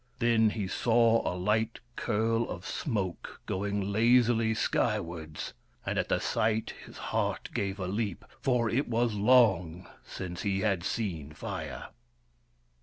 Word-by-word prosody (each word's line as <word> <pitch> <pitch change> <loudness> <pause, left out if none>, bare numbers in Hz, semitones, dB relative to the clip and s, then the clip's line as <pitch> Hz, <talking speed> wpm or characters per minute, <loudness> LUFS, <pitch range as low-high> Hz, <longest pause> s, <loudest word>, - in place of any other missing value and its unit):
Then 115 -3 +4
he 105 -3 -3
saw 115 +2 +3
a 90 - -4
light 110 +5 0 0.2
curl 115 +1 0
of - - -6
smoke 100 - -3
going 100 +1 -2
lazily 115 0 +4
skywards, 85 -9 -1 0.3
and - - -1
at - - -1
the - - +3
sight 110 0 0
his - - -12 0.2
heart - - -1
gave 100 0 -2
a 95 - -2
leap, 100 -1 -2 0.2
for 125 -3 +2
it 130 +6 0
was 115 -1 +1
long 100 -6 +3 0.2
since 90 -2 -6
he 100 -2 0
had 100 -5 +1
seen 85 - -3
Fire. - - -6
110 Hz, 135 wpm, -30 LUFS, 95-115 Hz, 0.3 s, Then